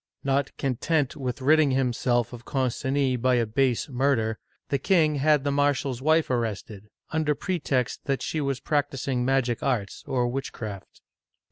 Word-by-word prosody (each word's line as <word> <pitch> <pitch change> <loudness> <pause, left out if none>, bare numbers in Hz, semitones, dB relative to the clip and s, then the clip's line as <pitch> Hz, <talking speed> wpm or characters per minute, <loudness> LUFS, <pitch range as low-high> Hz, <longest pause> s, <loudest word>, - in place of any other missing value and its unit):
Not 135 0 0
content 140 +2 0
with 130 -2 -4
ridding 155 +1 +5
himself 125 -2 +1
of 120 -1 -9
Concini 130 +1 0
by 130 0 +3
a 120 -1 +2
base 125 +2 +1
murder, 125 -5 0 0.3
the 140 - +1
king 155 -2 +3
had 150 0 +3
the 145 - 0
marshal's 140 -3 0
wife 155 0 +2
arrested, 110 -3 -3 0.2
under 155 -2 +1
pretext 140 -8 -2
that 135 -3 -1
she 155 - -2
was 140 -2 -1
practicing 135 -3 -1
magic 125 -2 +1
arts 115 -8 -2
or 125 -2 +1
witchcraft. 115 -6 -6
135 Hz, 145 wpm, -26 LUFS, 120-145 Hz, 0.3 s, ridding